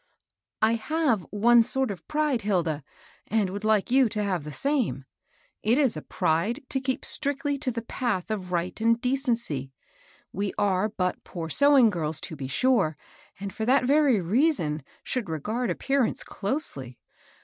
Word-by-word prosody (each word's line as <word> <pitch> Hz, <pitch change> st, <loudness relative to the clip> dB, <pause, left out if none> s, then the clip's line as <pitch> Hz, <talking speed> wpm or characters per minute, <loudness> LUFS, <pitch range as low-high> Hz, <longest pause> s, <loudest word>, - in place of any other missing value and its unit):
'' -, -, -65 dB
^^ 220 Hz, -, +5 dB
I 225 Hz, -, +2 dB
have 235 Hz, -, 0 dB
one 235 Hz, +3 st, +5 dB
sort 265 Hz, +1 st, 0 dB
of 190 Hz, -, -9 dB
pride, 300 Hz, -5 st, 0 dB
Hilda, 170 Hz, -7 st, 0 dB, 0.4 s
and 210 Hz, -4 st, +1 dB
would 200 Hz, +2 st, -5 dB
like 215 Hz, 0 st, +2 dB
you 260 Hz, -2 st, +5 dB
to 210 Hz, -1 st, -2 dB
have 185 Hz, -7 st, -2 dB
the 150 Hz, -, -6 dB
same: 215 Hz, -, 0 dB, 0.6 s
it 230 Hz, +4 st, +2 dB
is 275 Hz, -, +3 dB
a 155 Hz, -, -5 dB
pride 195 Hz, -, 0 dB
to 265 Hz, -, -1 dB
keep 260 Hz, -1 st, -2 dB
strictly 285 Hz, 0 st, 0 dB
to 260 Hz, -, -1 dB
the 230 Hz, -2 st, -4 dB
path 230 Hz, -5 st, -2 dB
of 185 Hz, -4 st, -4 dB
right 175 Hz, +4 st, -2 dB
and 230 Hz, +1 st, +3 dB
decency. 235 Hz, -, -1 dB, 0.6 s
We 200 Hz, +1 st, -2 dB
are. 200 Hz, +1 st, +1 dB
but 180 Hz, -4 st, -2 dB
poor 165 Hz, -2 st, -6 dB
sewing 280 Hz, -, +5 dB
girls, 160 Hz, -4 st, -2 dB
to 160 Hz, -, -5 dB
be 135 Hz, -2 st, -5 dB
sure, 195 Hz, -, +2 dB, 0.4 s
and 200 Hz, 0 st, -5 dB
for 220 Hz, -, -4 dB
that 260 Hz, +3 st, +4 dB
very 280 Hz, -4 st, +4 dB
rea 235 Hz, -, +3 dB
son 155 Hz, -, -3 dB, 0.2 s
should 245 Hz, -8 st, -3 dB
regard 215 Hz, -, -2 dB
appearance 270 Hz, +7 st, 0 dB
closely. 145 Hz, -, -2 dB
220 Hz, 170 wpm, -26 LUFS, 180-260 Hz, 0.6 s, ^^